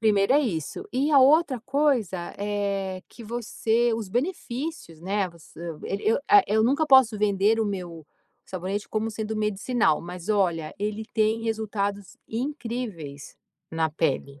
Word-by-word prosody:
Primeiro, 210 Hz, +1 st, +3 dB
é 285 Hz, -, +6 dB
isso. 200 Hz, -, -3 dB
E 275 Hz, +4 st, +1 dB
a 290 Hz, -, +7 dB
outra 275 Hz, -1 st, +5 dB
coisa, 245 Hz, -, 0 dB
eh, 200 Hz, -2 st, -2 dB
que 235 Hz, -, -12 dB
você 235 Hz, +1 st, 0 dB
os 225 Hz, -3 st, -4 dB
benefícios, 255 Hz, -, -3 dB
né. 195 Hz, +2 st, -1 dB
Voc 170 Hz, -1 st, -17 dB, 0.2 s
eu 165 Hz, -2 st, -7 dB
eu 195 Hz, -, -1 dB, 0.2 s
eu, -, -, +1 dB
eh, 410 Hz, -1 st, +8 dB
eu 220 Hz, +1 st, +2 dB
nunca 280 Hz, +7 st, +3 dB
posso 265 Hz, -6 st, +6 dB
vender 205 Hz, +1 st, +2 dB
o -, -, +2 dB
meu 175 Hz, -6 st, -5 dB, 0.4 s
sabonete 190 Hz, +3 st, -4 dB
como 220 Hz, +1 st, -1 dB
sendo 220 Hz, 0 st, -4 dB
medicinal. 210 Hz, -3 st, +1 dB
Mas 180 Hz, +2 st, -8 dB
olha, 175 Hz, -7 st, +1 dB
ele 210 Hz, +1 st, -3 dB
tem 220 Hz, +1 st, +1 dB
resultados 205 Hz, -3 st, -3 dB
incríveis 230 Hz, -, -5 dB, 0.3 s
na 160 Hz, -1 st, 0 dB
pele. 140 Hz, -2 st, -1 dB
210 Hz, 150 wpm, -26 LUFS, 185-240 Hz, 0.4 s, eh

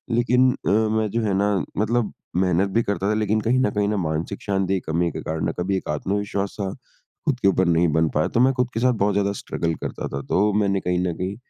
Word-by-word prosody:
लेकिन 125 Hz, +2 st, +4 dB
अ, -, -, +1 dB
मैं 110 Hz, +1 st, +2 dB
जो 115 Hz, -, 0 dB
है 100 Hz, -3 st, 0 dB
ना 100 Hz, 0 st, +2 dB, 0.2 s
मतलब 110 Hz, +2 st, 0 dB, 0.2 s
मेहनत 90 Hz, +1 st, +2 dB
भी 115 Hz, +3 st, +2 dB
करता 100 Hz, 0 st, -1 dB
था -, -, +2 dB
लेकिन 110 Hz, 0 st, +1 dB
कहीं 125 Hz, +4 st, +2 dB
न 130 Hz, -, +2 dB
कहीं 105 Hz, 0 st, +1 dB
ना 105 Hz, -, 0 dB
मानसिक 80 Hz, +2 st, -3 dB
शांति 95 Hz, -1 st, 0 dB
कमी 85 Hz, +2 st, +1 dB
के -, -, -6 dB
कारण, 80 Hz, 0 st, -2 dB
कभी 95 Hz, +2 st, 0 dB
एक -, -, -6 dB
आत्मविश्वास-सा 100 Hz, +4 st, -2 dB, 0.5 s
खुद 135 Hz, -5 st, 0 dB
के 100 Hz, -, +2 dB
ऊपर 95 Hz, -1 st, +3 dB
नहीं 85 Hz, 0 st, +3 dB
बन 80 Hz, 0 st, +3 dB
पाया। 75 Hz, -, 0 dB
तो 115 Hz, -, -1 dB
मैं 130 Hz, +2 st, +5 dB
खुद 125 Hz, -1 st, 0 dB
के 115 Hz, -, -1 dB
साथ 125 Hz, 0 st, +3 dB
बहुत 100 Hz, 0 st, +3 dB
ज़्यादा 100 Hz, 0 st, +1 dB
स्ट्रगल 85 Hz, -1 st, -2 dB
करता -, -, -4 dB
था। 70 Hz, -, -2 dB
तो 105 Hz, +2 st, +3 dB
मैंने 100 Hz, -2 st, +2 dB
कहीं 90 Hz, 0 st, 0 dB
न 85 Hz, -, -1 dB
कहीं 95 Hz, +2 st, -3 dB
100 Hz, 235 wpm, -23 LUFS, 90-110 Hz, 0.5 s, मैं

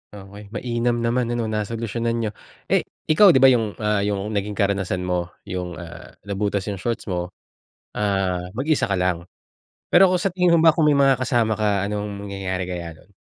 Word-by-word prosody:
Okey, 100 Hz, +1 st, -11 dB
mainam 120 Hz, 0 st, 0 dB
naman 120 Hz, +1 st, +1 dB
ano 120 Hz, 0 st, -1 dB
nasolusyonan 115 Hz, +2 st, -2 dB
niyo. 115 Hz, -2 st, -1 dB, 0.4 s
Eh -, -, +5 dB, 0.3 s
ikaw 200 Hz, +6 st, +7 dB
'di 130 Hz, -, +4 dB
ba 135 Hz, -, +9 dB
yung, 110 Hz, -4 st, 0 dB
ah, 105 Hz, -1 st, 0 dB
yung 100 Hz, +1 st, -2 dB
naging 105 Hz, 0 st, -2 dB
karanasan 95 Hz, -3 st, 0 dB
mo 90 Hz, -1 st, -1 dB, 0.2 s
yung, 90 Hz, -1 st, -5 dB
ah, 85 Hz, -1 st, -11 dB
nabutas 100 Hz, -1 st, -2 dB
yung 100 Hz, -, -6 dB
shorts 115 Hz, +4 st, -3 dB
mo, 90 Hz, 0 st, -2 dB, 0.7 s
ah, 95 Hz, -3 st, 0 dB, 0.2 s
mag-isa 145 Hz, +4 st, +1 dB
ka 100 Hz, -, +1 dB
lang 90 Hz, -2 st, 0 dB, 0.7 s
pero 190 Hz, +2 st, +7 dB
kung 180 Hz, -, +2 dB
sa 195 Hz, -, +1 dB
tingin 180 Hz, -2 st, +3 dB
mo -, -, +4 dB
ba 160 Hz, -, +8 dB
kung 155 Hz, -2 st, +3 dB
may 145 Hz, -, +4 dB
mga 135 Hz, -1 st, +5 dB
kasama 120 Hz, -3 st, +1 dB
ka 100 Hz, -2 st, +1 dB
anong 105 Hz, 0 st, -4 dB
mangyayari 95 Hz, -1 st, -3 dB
kaya 85 Hz, -3 st, -6 dB
nun? 95 Hz, -, -22 dB
105 Hz, 185 wpm, -22 LUFS, 95-120 Hz, 0.7 s, ba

